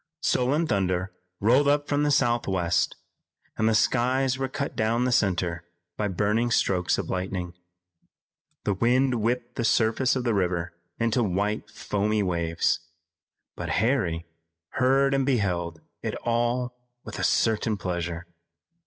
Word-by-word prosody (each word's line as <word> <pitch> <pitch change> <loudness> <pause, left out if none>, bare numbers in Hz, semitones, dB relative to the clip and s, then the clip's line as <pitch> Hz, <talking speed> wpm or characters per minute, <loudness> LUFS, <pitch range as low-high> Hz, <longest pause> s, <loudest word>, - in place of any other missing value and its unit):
Sullen 140 +7 +2
thunder 95 - 0 0.3
rolled 125 +7 +4
up 145 0 +2
from 145 0 +1
the 150 - +2
southwest, 115 -10 +1 0.6
and 110 +1 +2
the 110 - +2
skies 130 +4 +2
were 135 - 0
cut 140 +2 -4
down 115 +3 +1
the 125 - +1
center 90 -6 +1 0.3
by 105 - -1
burning 105 +5 +1
strokes 90 -6 +1
of - - -3
lightning. 90 -1 -3 1.1
The 105 - +1
wind 120 +3 +2
whipped 120 +2 -2
the - - 0
surface 115 +3 +2
of 130 - -1
the 120 -2 +1
river 90 -3 -1 0.2
into 115 +1 +1
white 105 +2 -1
foamy 105 0 -1
waves. 85 -3 0 0.8
But - - -5
Harry 95 -8 +1 0.4
heard 135 +2 +2
and 135 0 +2
beheld 90 - -1 0.2
it - - -3
all 120 +1 0 0.3
with - - -7
a - - -2
certain 110 -1 +2
pleasure. 85 -2 -3
110 Hz, 135 wpm, -26 LUFS, 95-125 Hz, 1.1 s, rolled